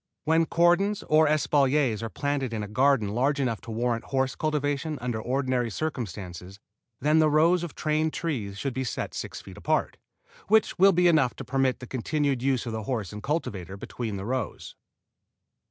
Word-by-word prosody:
When 160 +1 +3
cordons 175 +5 +2
or 155 0 +4
espaliers 145 -5 +2
are 115 - -4
planted 140 -2 -2
in 110 -2 -2
a - - -5
garden 125 -1 +2
large 135 +7 +1
enough 120 -5 -1
to - - -11
warrant 115 +1 -1
horse 130 -1 0
cultivation 150 0 -1
under 120 -3 -3
ordinary 130 -1 0
circumstances 100 - -5 0.4
then 150 +3 +3
the 155 -1 +4
rows 165 +4 +4
of 170 - -6
trained 155 +1 0
trees 115 -14 -3
should 135 +4 -3
be 130 - -2
set 125 - -4
six - - -6
feet - - -12
apart, - - 0 0.5
which 220 -3 +3
will 195 +1 +7
be 180 0 +3
enough 150 -7 +3
to - - -8
permit 135 0 0
the - - -6
continued 135 +1 -1
use 130 -1 +1
of 115 - -4
the 110 -2 -4
horse 110 -7 -3
and 105 - -7
cultivator 100 - -3
between 110 0 -5
the 95 - -5
rows. 125 -3 -4
135 Hz, 180 wpm, -27 LUFS, 115-155 Hz, 0.5 s, will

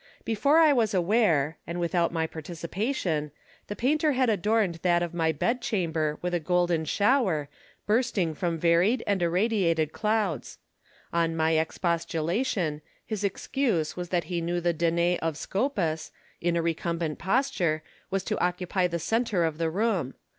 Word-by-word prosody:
Before 280 +8 +3
I 315 -3 +6
was 225 -6 +1
aware, 170 -6 +2
and 170 +1 -4
without 170 0 +1
my 165 -1 0
participation, 165 - -3 0.4
the 205 - -5
painter 300 +5 +2
had 255 -2 +2
adorned 205 -3 +1
that 175 -1 +3
of 175 - -4
my 165 -2 +1
bed 235 - -1
chamber 160 -9 -1
with 180 0 -1
a 175 - +2
golden 175 0 +1
shower, 200 - +2 0.4
bursting 210 -7 +1
from 170 0 -2
varied 175 +9 +3
and 200 -2 0
irradiated 170 -3 +1
clouds. 210 - -1 0.6
On 165 -1 +1
my 160 0 +2
ex 160 0 0
postulation, 170 - -1 0.2
his 215 -2 -4
excuse 200 - -1
was 180 -1 -5
that 175 -2 +1
he 170 +2 -3
knew 175 +1 -1
the 175 0 +1
Danae 170 +2 +1
of 160 -2 -2
Scopas, 190 - -1 0.3
in 175 0 +1
a 170 - +1
recumbent 165 -1 -2
posture, 190 - 0 0.3
was 195 0 -1
to 215 - -2
occupy 180 +1 0
the 170 -1 -2
centre 210 +1 0
of 160 -1 -1
the 165 -1 +1
room. 190 - -1
175 Hz, 155 wpm, -27 LUFS, 165-210 Hz, 0.6 s, I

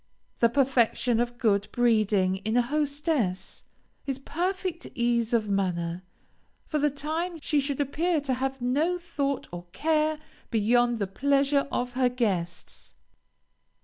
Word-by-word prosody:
The 235 - +5
perfection 250 -2 +2
of 240 0 -1
good 205 -4 +2
breeding 210 -6 +2
in 220 +4 -1
a - - +6
hostess, 285 - -1 0.4
is 270 -2 -1
perfect 355 +4 -3
ease 235 -1 +1
of 225 -3 +1
manner; 180 -3 -1 0.6
for 305 - -1
the 295 +1 +3
time 320 +5 -3
she 295 0 +1
should 280 0 -2
appear 315 +4 +1
to 270 -2 -1
have 265 0 -3
no 300 +8 +1
thought 285 -6 -3
or 175 0 -8
care 310 +2 +1 0.3
beyond 240 +2 +2
the 205 - -1
pleasure 275 +7 +1
of 245 0 -2
her 255 0 +2
guests. 190 -8 -3
250 Hz, 135 wpm, -27 LUFS, 220-295 Hz, 0.6 s, a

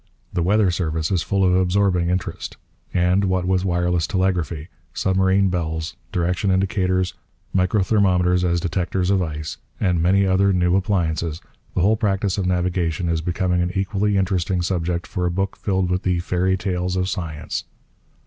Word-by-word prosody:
The 85 - 0
weather 100 +2 +3
service 80 -2 -1
is 90 -3 +2
full 100 +2 +1
of 90 - +3
absorbing 90 -1 +2
interest. 90 0 -3 0.3
And, 90 +2 +2
what 95 -1 0
with 95 0 +1
wireless 90 -2 +1
telegraphy, 90 -5 -1 0.3
submarine 95 +1 +2
bells, 80 -3 -3 0.2
direction 90 +3 0
indicators, 95 -1 +1 0.4
microthermometers 90 -2 +2
as 85 -1 +1
detectors 90 +1 -1
of 95 -1 +3
ice, 75 -4 -4 0.2
and 90 -4 +1
many 95 +3 +3
other 95 +1 +3
new 90 0 +2
appliances, 85 -5 0 0.4
the - - +2
whole 105 +5 +3
practice 100 -2 0
of 95 - -1
navigation 90 -2 0
is 80 -1 0
becoming 90 +1 0
an 90 +1 -1
equally 100 +1 0
interesting 95 -1 0
subject 85 -1 -1
for 90 -3 -2
a - - +1
book 95 +3 -2
filled 95 -3 -1
with 90 +1 0
the 90 -1 0
'fairy 90 +2 0
tales 90 -1 -2
of 90 0 0
science.' 80 -5 -4
90 Hz, 160 wpm, -22 LUFS, 85-95 Hz, 0.4 s, weather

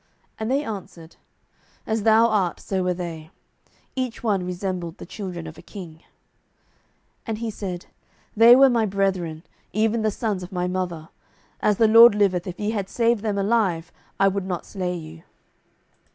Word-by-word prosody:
And 220 +1 -2
they 275 +3 +1
answered, 185 - -8 0.7
As 220 0 -1
thou 220 +2 +5
art, 205 -6 +1
so 190 -1 -2
were 180 0 +1
they; 165 -3 -6 0.7
each 255 -3 -3
one 200 -5 +1
resembled 180 -1 -4
the - - -9
children 180 -5 -6
of 160 0 -10
a - - -11
king. 175 -3 -10
07:008:019 - - -27 1.3
And 220 -1 -2
he 225 0 -3
said, 185 -4 -6 0.5
They 230 +3 +8
were 270 +1 +7
my 230 -2 +2
brethren, 185 -5 -1 0.3
even 220 +2 +1
the 215 - +2
sons 210 -2 -2
of 180 +2 -8
my 180 -1 -1
mother: 180 -3 -3 0.5
as 210 -2 +2
the 225 - +5
LORD 230 0 +8
liveth, 190 -4 +1
if 180 - -6
ye 210 +1 -1
had 200 -3 -3
saved 235 -2 +1
them 210 -2 -1
alive, 195 -5 0 0.3
I 195 - +5
would 195 -1 -1
not 180 -2 -4
slay 180 -3 -3
you. 160 -1 -9
195 Hz, 170 wpm, -23 LUFS, 180-220 Hz, 1.3 s, They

